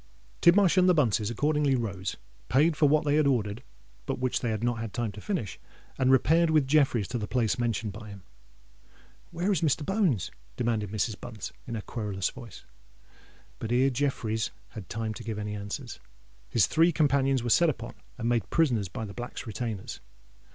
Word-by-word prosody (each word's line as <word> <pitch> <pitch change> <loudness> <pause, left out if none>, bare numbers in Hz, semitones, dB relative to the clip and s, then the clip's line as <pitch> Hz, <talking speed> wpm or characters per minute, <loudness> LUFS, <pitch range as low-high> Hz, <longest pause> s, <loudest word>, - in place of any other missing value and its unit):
Tidmarsh 185 +1 +5
and 185 0 +6
the 180 - +5
Bunces 110 -7 +2
accordingly 145 +3 +1
rose, 100 -6 -3 0.3
paid 150 +7 +4
for 150 -1 +4
what 150 +1 +3
they 145 0 +3
had 155 -2 +3
ordered, 110 -4 0 0.5
but - - -1
which 130 0 0
they 120 - -2
had 110 0 -2
not 115 -2 -1
time 120 -3 -2
to 105 +1 -10
finish, 165 - -3 0.4
and 130 - +3
repaired 160 +6 +4
with 155 -3 +3
Jeffreys 135 -7 +3
to 120 - -2
the 105 - -4
place 125 -1 0
mentioned 115 -3 -1
by 105 0 -9
him. 100 -2 -11 1.1
"Where 175 +4 -1
is 185 - +1
Mr. 150 -1 +1
Bones?" 190 - +1 0.3
demanded 115 -4 0
Mrs. 110 +1 -2
Bunce, 110 -4 -7
in 115 - -4
her 110 - -3
querulous 105 -4 -3
voice. 115 - -11 0.9
But 115 - -4
ere 130 +3 +3
Jeffreys 115 -5 -1 0.2
had 105 -6 -9
time 110 0 -3
to 120 - -9
give 110 -2 -4
any 105 0 -4
answer, 100 0 -5 0.6
his 115 - +4
three 165 +2 +3
companions 135 -4 +2
were 120 - -1
set 170 +6 +5
upon 120 -5 -5 0.2
and 115 -1 -3
made 120 -2 +1
prisoners 125 - +2
by 110 - -5
the 100 - -8
Black's 120 +4 -6
retainers. 110 -3 -5
120 Hz, 185 wpm, -28 LUFS, 110-145 Hz, 1.1 s, and